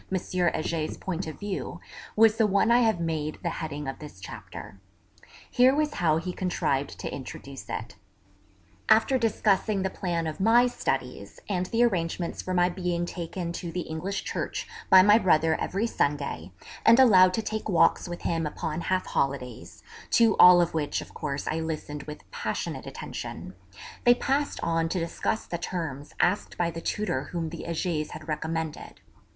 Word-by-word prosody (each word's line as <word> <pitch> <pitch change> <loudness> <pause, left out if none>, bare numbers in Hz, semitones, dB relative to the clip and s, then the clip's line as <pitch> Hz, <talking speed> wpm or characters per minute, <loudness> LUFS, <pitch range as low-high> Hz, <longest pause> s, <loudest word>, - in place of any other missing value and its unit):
Heger's 175 -4 -1
point 185 -1 -4
of 155 - -7
view 205 -2 -4 0.4
was 220 0 +5
the 220 - +4
one 200 +3 +3
I 240 - +6
have 220 -6 +2
made 155 -2 -2
the 170 - -1
heading 150 -2 -5
of 135 - -5
this 150 -10 -11
chapter. 95 +1 -9 0.7
Here 255 +2 +5
was 300 0 0
how 160 -3 +2
he 180 +2 -4
contrived 145 -7 -1
to - - -4
introduce 135 0 -8
it. - - -5 0.9
After 225 +4 +5
discussing 210 -3 +1
the 190 - -1
plan 170 -3 -2
of 155 +2 -4
my 230 +5 +5
studies, 245 - -3
and 185 -3 -1
the 230 +4 +2
arrangements 175 -5 -1
for 185 - -5
my 175 0 +4
being 175 -1 -2
taken 175 0 -5
to 170 -1 -5
the 180 - -2
English 175 +5 -4
church - - -4 0.2
by 185 -1 +9
my 210 +3 +6
brother 160 -5 +3
every 200 +5 -1
Sunday, 140 - -1 0.3
and 230 +2 +7
allowed 185 -8 +7
to 225 - -2
take 220 0 -3
walks 175 0 +3
with 175 - -6
him 165 -2 0
upon 155 +2 -4
half 185 +1 0
holidays 125 -11 -3 0.3
(to 225 -3 +4
all 180 0 +9
of 170 - 0
which 155 -3 -1
of - - -12
course 140 -2 -4
I 160 - -1
listened 155 -2 -5
with 150 0 -8
passionate 480 -1 -4
attention), - - -7 0.5
they 245 -1 +6
passed 280 +3 -1
on 165 -1 +1
to 185 - -1
discuss 170 +6 -2
the 170 - -4
terms 155 -6 -5
asked 180 +4 +1
by 170 -1 0
the 165 - -7
tutor 175 -12 -2
whom 165 -2 -4
the 170 - -7
Hegers 165 -2 -2
had 155 0 -9
recommended. 160 0 -4
175 Hz, 170 wpm, -27 LUFS, 155-200 Hz, 0.9 s, by